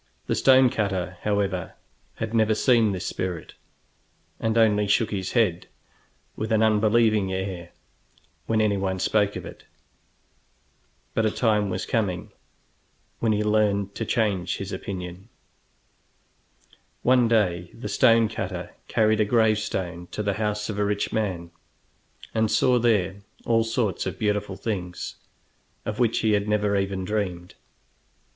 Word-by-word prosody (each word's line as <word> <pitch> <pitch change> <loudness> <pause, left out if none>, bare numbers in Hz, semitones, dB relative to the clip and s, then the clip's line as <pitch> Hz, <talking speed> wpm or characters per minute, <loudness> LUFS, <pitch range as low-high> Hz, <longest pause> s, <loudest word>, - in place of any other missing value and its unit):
The - - -1
stone 130 -2 +5
cutter, 95 -3 -2
however, 100 -3 -1 0.4
had 110 0 -4
never 110 -1 +3
seen 115 -3 +3
this 95 -1 -4
spirit, 90 -3 -4 0.9
and 110 0 0
only 105 -2 +3
shook 105 +2 +2
his 95 -3 -3
head, 100 -8 +1 0.7
with 110 +1 -4
an 110 0 +3
unbelieving 110 -2 +3
air, 95 -2 -4 0.8
when 110 -1 +2
anyone 100 -3 0
spoke 105 +2 +1
of - - -6
it. - - -11 1.5
But 110 -1 +2
a - - +2
time 105 -2 +1
was 95 0 -3
coming 100 -7 -1 0.9
when 115 - +1
he 105 0 +1
learned 105 -2 +1
to 115 - -4
change 105 -5 0
his - - -6
opinion. 90 +2 -6 1.7
One 125 -1 +4
day 90 -6 +1
the 120 - -7
stone 115 -3 +4
cutter 110 - -5 0.2
carried 110 -1 +2
a 105 - +4
gravestone 105 -6 0
to 105 - -2
the 100 -1 0
house 105 0 -1
of 105 -2 -4
a - - +2
rich 100 0 -1
man, 90 -6 -2 0.8
and 110 -1 +1
saw 125 +4 +3
there 100 -5 +1 0.3
all 115 -1 +3
sorts 115 -3 -1
of - - -4
beautiful 105 -2 -1
things, 90 -5 -4 0.7
of 110 +2 -4
which 120 -2 +2
he 110 - +2
had 105 0 +1
never 105 -1 +1
even 95 -1 -1
dreamed. 90 -4 -3
105 Hz, 140 wpm, -25 LUFS, 95-110 Hz, 1.7 s, stone